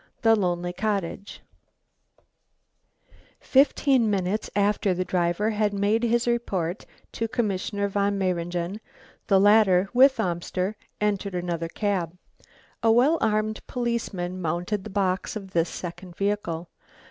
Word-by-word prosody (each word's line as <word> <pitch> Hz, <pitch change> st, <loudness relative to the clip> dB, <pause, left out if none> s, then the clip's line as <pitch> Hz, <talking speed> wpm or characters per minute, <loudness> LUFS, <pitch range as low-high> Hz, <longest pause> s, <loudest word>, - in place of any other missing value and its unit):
THE 225 Hz, -1 st, +6 dB
LONELY 175 Hz, -3 st, -1 dB
COTTAGE 200 Hz, -1 st, -3 dB, 2.0 s
Fifteen 270 Hz, -3 st, +3 dB
minutes 200 Hz, +1 st, -1 dB
after 200 Hz, -2 st, +2 dB
the 185 Hz, +1 st, -2 dB
driver 180 Hz, +5 st, 0 dB
had 210 Hz, -1 st, 0 dB
made 205 Hz, +3 st, +1 dB
his 235 Hz, 0 st, +1 dB
report 195 Hz, -7 st, -1 dB, 0.2 s
to 225 Hz, -, -2 dB
Commissioner 205 Hz, -3 st, -1 dB
Von 200 Hz, 0 st, 0 dB
Mayringen, 175 Hz, +1 st, -2 dB, 0.5 s
the 195 Hz, -2 st, +5 dB
latter 200 Hz, -2 st, +5 dB
with 260 Hz, 0 st, +5 dB
Amster 185 Hz, +1 st, -2 dB, 0.2 s
entered 200 Hz, -2 st, -1 dB
another 170 Hz, -2 st, -2 dB
cab. 180 Hz, -2 st, -2 dB, 0.6 s
A 225 Hz, -1 st, +4 dB
well 265 Hz, +8 st, +4 dB
armed 215 Hz, 0 st, 0 dB
policeman 215 Hz, -7 st, -3 dB
mounted 175 Hz, +5 st, -2 dB
the -, -, -6 dB
box 190 Hz, +2 st, -1 dB
of 195 Hz, -3 st, -7 dB
this 165 Hz, -2 st, +1 dB
second 175 Hz, 0 st, -8 dB
vehicle. 190 Hz, -5 st, -2 dB
200 Hz, 120 wpm, -25 LUFS, 180-215 Hz, 2.0 s, THE